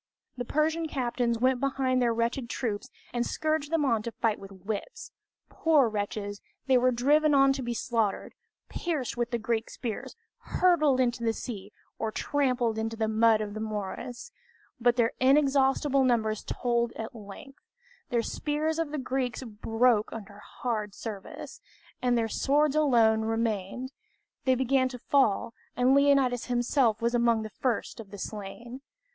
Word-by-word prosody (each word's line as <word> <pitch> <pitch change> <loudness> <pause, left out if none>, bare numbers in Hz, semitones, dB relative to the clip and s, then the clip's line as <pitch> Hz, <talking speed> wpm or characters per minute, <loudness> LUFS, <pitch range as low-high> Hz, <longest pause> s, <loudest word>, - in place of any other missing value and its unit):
The 245 - -4
Persian 320 +4 0
captains 240 -4 -1
went 255 +2 +2
behind 265 -1 +1
their 240 -1 +3
wretched 235 +2 -1
troops 230 0 -3 0.2
and 240 -1 +1
scourged 310 +2 -1
them 325 -3 +2
on 230 -5 +2
to 235 - -4
the 225 - -18
fight 225 -3 +1
with 195 0 -11
whips! 215 - -5 0.4
Poor 305 -6 +3
wretches, 205 -1 -4 0.2
they 265 -1 +3
were 250 0 +4
driven 290 +5 +3
on 275 0 +5
to 270 - -4
be 240 -1 -3
slaughtered, 225 -3 -1 0.3
pierced 305 -10 -3
with 240 0 -1
the 240 - -1
Greek 230 0 -2
spears, 230 -4 -5 0.2
hurled 310 -7 +2
into 240 -2 +1
the 225 -1 +2
sea, 210 -4 -7 0.3
or 220 -1 -1
trampled 250 -5 0
into 225 +1 -2
the 220 -1 0
mud 220 0 +4
of 205 -1 -4
the 215 - -5
morass; 220 - -5 0.5
but 240 0 +3
their 235 -2 +2
inexhaustible 270 0 +3
numbers 220 -4 +1
told 235 -1 0
at 225 - -6
length. 220 +6 -11 0.5
The 240 -3 +1
spears 310 +4 -2
of 325 -2 -1
the 300 - -4
Greeks 260 -2 -2
broke 225 0 +1
under 205 -2 -9
hard 215 -3 -4
service, 205 -4 -8 0.4
and 245 -1 +2
their 225 -1 +1
swords 290 +5 +2
alone 230 -7 +4
remained; 225 +2 -2 0.5
they 260 -1 +4
began 260 +1 +2
to 250 - -7
fall, 235 -4 +1 0.2
and 250 +2 +4
Leonidas 275 -3 +3
himself 240 -2 +1
was 235 +1 +1
among 235 -2 +2
the 215 - -7
first 245 +1 -2
of 215 -3 -9
the 205 - -9
slain. 220 +6 -7
240 Hz, 160 wpm, -28 LUFS, 225-270 Hz, 0.5 s, on